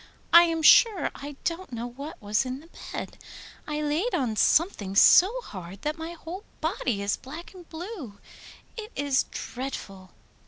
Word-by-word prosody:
I 340 Hz, +1 st, +10 dB
am 330 Hz, -1 st, -1 dB
sure 425 Hz, +2 st, +6 dB
I 285 Hz, 0 st, -8 dB
don't 340 Hz, 0 st, -3 dB
know 235 Hz, 0 st, -4 dB
what 275 Hz, +6 st, -8 dB
was 210 Hz, 0 st, 0 dB
in 255 Hz, 0 st, -5 dB
the 325 Hz, +3 st, -17 dB, 0.2 s
bed. -, -, -6 dB, 0.5 s
I 300 Hz, 0 st, -2 dB
laid 315 Hz, +11 st, 0 dB
on 245 Hz, -6 st, -1 dB
something 215 Hz, -, +2 dB
so 370 Hz, -, +7 dB
hard 190 Hz, -, -10 dB
that 300 Hz, +2 st, -2 dB
my 325 Hz, +1 st, -5 dB
whole 345 Hz, +4 st, -8 dB, 0.2 s
body 205 Hz, -6 st, -1 dB
is 200 Hz, -, 0 dB
black 315 Hz, +8 st, -10 dB
and 355 Hz, -3 st, -14 dB
blue. 325 Hz, -, -8 dB, 0.6 s
It 440 Hz, 0 st, -7 dB
is 285 Hz, -2 st, +1 dB
dreadful! 195 Hz, -7 st, -7 dB
295 Hz, 160 wpm, -26 LUFS, 235-340 Hz, 0.6 s, I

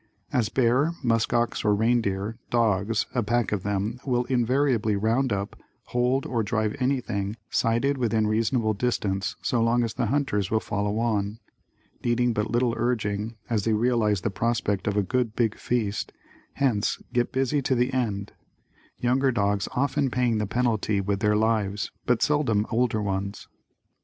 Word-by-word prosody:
As 115 Hz, -4 st, +2 dB
bear, 130 Hz, +6 st, +2 dB
muskox, 120 Hz, 0 st, +1 dB
or 105 Hz, -1 st, +3 dB
reindeer, 110 Hz, -2 st, 0 dB
dogs, 110 Hz, -2 st, +1 dB
a 125 Hz, -, +1 dB
pack 120 Hz, +1 st, 0 dB
of 105 Hz, -3 st, -1 dB
them 105 Hz, +4 st, -2 dB
will 125 Hz, -2 st, +1 dB
invariably 125 Hz, -3 st, +1 dB
round 115 Hz, +6 st, +1 dB
up, 100 Hz, 0 st, -2 dB, 0.3 s
hold 125 Hz, +2 st, +1 dB
or 120 Hz, -3 st, -1 dB
drive 110 Hz, 0 st, -1 dB
anything 115 Hz, -6 st, -1 dB, 0.2 s
sighted 130 Hz, +5 st, +1 dB
within 110 Hz, -3 st, +1 dB
reasonable 110 Hz, +1 st, +1 dB
distance 100 Hz, -3 st, -1 dB
so 120 Hz, -, +1 dB
long 120 Hz, +1 st, +3 dB
as 115 Hz, -, -2 dB
the 125 Hz, -3 st, -1 dB
hunters 110 Hz, -7 st, 0 dB
will 110 Hz, -, +2 dB
follow 105 Hz, 0 st, -2 dB
on, 110 Hz, -2 st, 0 dB, 0.7 s
needing 120 Hz, 0 st, +2 dB
but 105 Hz, 0 st, -1 dB
little 120 Hz, 0 st, +1 dB
urging, 110 Hz, -2 st, -1 dB
as 110 Hz, -4 st, 0 dB
they 110 Hz, -, +1 dB
realize 110 Hz, -3 st, +2 dB
the 105 Hz, -, -1 dB
prospect 105 Hz, -2 st, -1 dB
of 105 Hz, 0 st, 0 dB
a 105 Hz, -, +3 dB
"good 115 Hz, +3 st, -1 dB
big 115 Hz, -3 st, +1 dB
feast," 110 Hz, -4 st, -2 dB, 0.4 s
hence 120 Hz, -7 st, 0 dB
get 120 Hz, -1 st, +1 dB
busy 135 Hz, +2 st, +1 dB
to 130 Hz, 0 st, +1 dB
the 125 Hz, +2 st, +1 dB
end; 105 Hz, -6 st, -1 dB, 0.7 s
younger 130 Hz, +2 st, +2 dB
dogs 100 Hz, -3 st, 0 dB
often 140 Hz, +1 st, +1 dB
paying 120 Hz, -3 st, +1 dB
the 105 Hz, -, -1 dB
penalty 110 Hz, -2 st, 0 dB
with 100 Hz, 0 st, -1 dB
their 105 Hz, +1 st, +2 dB
lives 105 Hz, -2 st, 0 dB, 0.2 s
but 120 Hz, -2 st, +2 dB
seldom 130 Hz, -9 st, +2 dB
older 110 Hz, -2 st, +1 dB
ones. 100 Hz, 0 st, -3 dB
115 Hz, 155 wpm, -26 LUFS, 105-125 Hz, 0.7 s, or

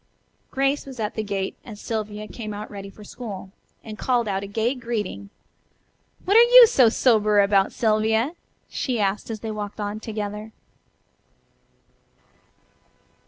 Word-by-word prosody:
Grace 275 Hz, +1 st, 0 dB
was 260 Hz, -3 st, -9 dB
at 210 Hz, -1 st, -2 dB
the 220 Hz, -, -2 dB
gate 200 Hz, -2 st, -3 dB
as 215 Hz, -4 st, -10 dB
Sylvia 215 Hz, -1 st, -4 dB
came 215 Hz, -1 st, -7 dB
out 210 Hz, +1 st, -7 dB
ready 200 Hz, -1 st, -8 dB
for 210 Hz, +2 st, -14 dB
school, 200 Hz, -4 st, -8 dB, 0.3 s
and 215 Hz, -1 st, -9 dB
called 245 Hz, -3 st, +1 dB
out 195 Hz, -1 st, -1 dB
a 200 Hz, -, -6 dB
gay 220 Hz, +5 st, 0 dB
greeting. 215 Hz, -, -4 dB, 1.0 s
"What 400 Hz, -, +2 dB
are 460 Hz, -, +9 dB
you 485 Hz, +1 st, +9 dB
so 265 Hz, -, +4 dB
sober 215 Hz, -3 st, +3 dB
about, 200 Hz, -1 st, +3 dB
Sylvia?" 220 Hz, +4 st, +1 dB, 0.3 s
she 250 Hz, -4 st, -2 dB
asked 200 Hz, +2 st, -1 dB
as 220 Hz, -2 st, -5 dB
they 225 Hz, -, -4 dB
walked 210 Hz, 0 st, -6 dB
on 205 Hz, +1 st, -3 dB
together. 210 Hz, 0 st, -6 dB
215 Hz, 145 wpm, -23 LUFS, 205-235 Hz, 1.0 s, are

